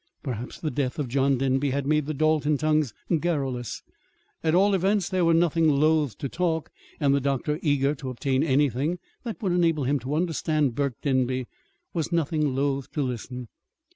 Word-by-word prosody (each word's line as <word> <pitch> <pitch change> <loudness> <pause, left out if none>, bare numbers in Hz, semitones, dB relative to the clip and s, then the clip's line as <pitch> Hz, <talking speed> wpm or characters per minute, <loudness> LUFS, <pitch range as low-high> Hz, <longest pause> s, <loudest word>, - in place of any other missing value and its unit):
Perhaps 125 -3 -5
the 155 - -2
death 130 -1 -2
of 145 -4 -2
John 135 +2 +2
Denby 135 +2 +1
had 140 +1 -1
made 150 0 +1
the 155 - -1
Dalton 155 0 +2
tongues 155 -3 +1 0.3
garrulous. 135 -8 -2 0.6
At 160 0 +2
all 200 +2 +4
events 195 0 +2
they 185 -1 0
were 165 -1 +4
nothing 165 -1 +3
loath 150 -4 +2
to 140 - -3
talk; 165 +1 -1 0.3
and 140 -3 +3
the 140 - +2
doctor, 140 +3 -1
eager 145 -2 +2
to 135 -3 -6
obtain 130 +1 0
anything 145 +2 +1 0.3
that 230 -3 -5
would 190 - +1
enable 165 -4 +2
him 140 +2 +1
to 130 +4 -3
understand 155 -4 0
Burke 140 -1 -2
Denby, 130 -2 +1 0.5
was 165 -1 -2
nothing 150 -4 0
loath 135 -1 -1
to 150 - 0
listen. 125 0 -5
145 Hz, 175 wpm, -26 LUFS, 135-160 Hz, 0.6 s, all